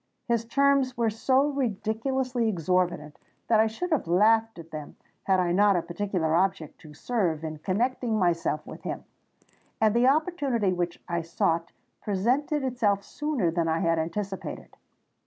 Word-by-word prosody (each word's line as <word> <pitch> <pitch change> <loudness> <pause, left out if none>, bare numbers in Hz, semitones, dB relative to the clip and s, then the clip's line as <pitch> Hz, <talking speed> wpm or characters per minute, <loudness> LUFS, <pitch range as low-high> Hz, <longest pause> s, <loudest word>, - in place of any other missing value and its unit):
His 235 -1 +1
terms 275 0 +2
were 230 -2 +1
so 260 +6 +2
ridiculously 250 0 -1
exorbitant 175 -4 -1 0.3
that 225 -2 +4
I 220 - +5
should 345 +12 -4
have 305 - +1
laughed 220 +5 +3
at 165 -1 -11
them, 155 -1 -7 0.3
had 190 -1 +3
I 175 -1 +1
not 200 +2 +4
a 175 - 0
particular 170 -2 -2
object 170 -3 0
to 155 -3 -13
serve 175 -6 -1
in 155 -1 -5
connecting 230 +5 0
myself 170 -5 0
with - - -10
him. - - -5 0.8
And 220 -1 +3
the 240 +2 +4
opportunity 275 - +1
which 175 -1 -2
I 170 -1 -1
sought 165 0 -1 0.3
presented 255 +9 0
itself 220 -6 +1
sooner 285 - -1
than 165 0 0
I 160 0 +1
had 165 -2 +2
anticipated. 190 +4 -5
205 Hz, 155 wpm, -27 LUFS, 170-245 Hz, 0.8 s, I